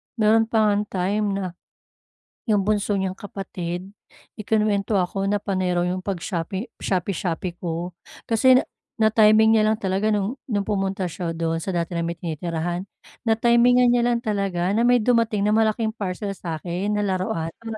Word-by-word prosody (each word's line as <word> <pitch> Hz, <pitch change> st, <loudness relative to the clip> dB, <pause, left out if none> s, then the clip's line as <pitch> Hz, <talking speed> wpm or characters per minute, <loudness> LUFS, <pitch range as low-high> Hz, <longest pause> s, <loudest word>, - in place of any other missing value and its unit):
Meron 225 Hz, 0 st, +3 dB
pa 220 Hz, -2 st, +3 dB
ngang 205 Hz, 0 st, 0 dB
time 200 Hz, +3 st, -1 dB
na 195 Hz, -, -2 dB, 1.0 s
'yong 205 Hz, -3 st, +2 dB
bunso 205 Hz, 0 st, +1 dB
niyang 190 Hz, -1 st, -2 dB
kapatid 185 Hz, -3 st, -6 dB, 0.5 s
ikinuwento 210 Hz, -1 st, 0 dB
ako 195 Hz, +1 st, 0 dB
na 205 Hz, 0 st, 0 dB
panay 185 Hz, -2 st, -1 dB
raw 175 Hz, -, +2 dB
iyong 185 Hz, +1 st, -2 dB
pag-shopping 190 Hz, +2 st, -3 dB
shopee-shopee 180 Hz, -1 st, -2 dB
ko. 175 Hz, +1 st, -3 dB, 0.4 s
Kasi 255 Hz, +3 st, +5 dB
na -, -, -2 dB, 0.5 s
na-timing 220 Hz, 0 st, +5 dB
niya 215 Hz, -, +3 dB
lang 220 Hz, -, +2 dB
talaga 195 Hz, +3 st, +1 dB
no'ng 210 Hz, +6 st, -1 dB
no'ng 205 Hz, -5 st, -1 dB
pumunta 195 Hz, -2 st, -1 dB
siya 170 Hz, 0 st, -4 dB
do'n 165 Hz, 0 st, -1 dB
sa 185 Hz, +3 st, -4 dB
dati 170 Hz, 0 st, -2 dB
naming 170 Hz, 0 st, -2 dB
tinitirahan 170 Hz, +2 st, -3 dB, 0.4 s
na-timingan 235 Hz, +2 st, +4 dB
niya 240 Hz, 0 st, +3 dB
lang 240 Hz, -1 st, +1 dB
talaga 195 Hz, -5 st, -1 dB
na 225 Hz, +4 st, +2 dB
may 245 Hz, -1 st, +4 dB
dumating 230 Hz, -3 st, +2 dB
na 205 Hz, -, +2 dB
malaking 220 Hz, +1 st, +2 dB
parcel 200 Hz, -2 st, -4 dB
sa'kin 180 Hz, +2 st, -3 dB
na 210 Hz, -, 0 dB
laruan 185 Hz, -3 st, -1 dB
para 225 Hz, -1 st, -7 dB
200 Hz, 160 wpm, -23 LUFS, 180-220 Hz, 1.0 s, Kasi